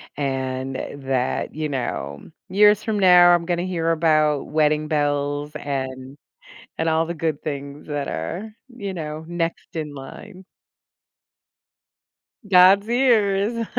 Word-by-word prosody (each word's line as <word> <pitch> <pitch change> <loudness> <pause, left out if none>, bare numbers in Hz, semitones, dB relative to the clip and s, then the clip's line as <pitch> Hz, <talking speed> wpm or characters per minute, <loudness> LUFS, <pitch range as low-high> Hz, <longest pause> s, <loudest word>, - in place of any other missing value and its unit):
and 130 -1 -3
that, 135 -1 -3
you 155 0 -2
know, 70 - -4 0.2
years 210 +2 +4
from 215 -2 -1
now, 180 -2 +7
I'm 170 -1 +1
gonna 175 0 -1
hear 165 -3 -1
about 155 -3 +2
wedding 155 0 +1
bells 145 -1 -1
and 130 -1 -5 0.6
and 160 - +1
all 160 +1 +2
the 170 - -4
good 160 -3 -3
things 140 -1 -6
that 145 -2 -3
are, 180 - -5 0.2
you 200 -6 -6
know, 155 -2 -6
next 170 -1 -4
in 150 -2 -4
line. 185 +8 -11 2.0
God's 195 +2 +6
ears! 230 -3 +2
155 Hz, 120 wpm, -22 LUFS, 145-185 Hz, 2.0 s, now